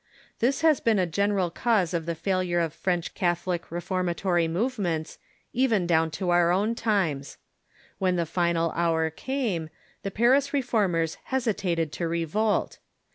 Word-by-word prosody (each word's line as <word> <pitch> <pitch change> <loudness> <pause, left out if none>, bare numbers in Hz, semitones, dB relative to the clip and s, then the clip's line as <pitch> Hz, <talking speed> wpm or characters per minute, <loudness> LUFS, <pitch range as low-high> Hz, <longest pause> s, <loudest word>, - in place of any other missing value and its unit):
This 265 +7 +1
has 315 -3 +4
been 225 -2 +2
a 185 - +2
general 195 +1 0
cause 195 -3 +1
of 165 -1 -2
the 170 - -1
failure 185 0 0
of 165 -2 -1
French 175 0 -2
Catholic 175 -1 -1
reform 180 +2 -2
atory 175 -1 +1
movements, 175 -5 -2 0.3
even 230 -7 +2
down 165 -1 +2
to 180 -2 -1
our 175 0 +4
own 205 +5 +1
times. 190 - -1 0.6
When 185 -1 +2
the 170 -1 0
final 170 0 0
hour 165 -1 +1
came, 205 - -2 0.3
the 200 - -3
Paris 250 +8 +3
Reformers 200 - 0
hesitated 200 - -1
to 170 - -3
revolt. 170 +6 0
180 Hz, 145 wpm, -26 LUFS, 170-215 Hz, 0.6 s, has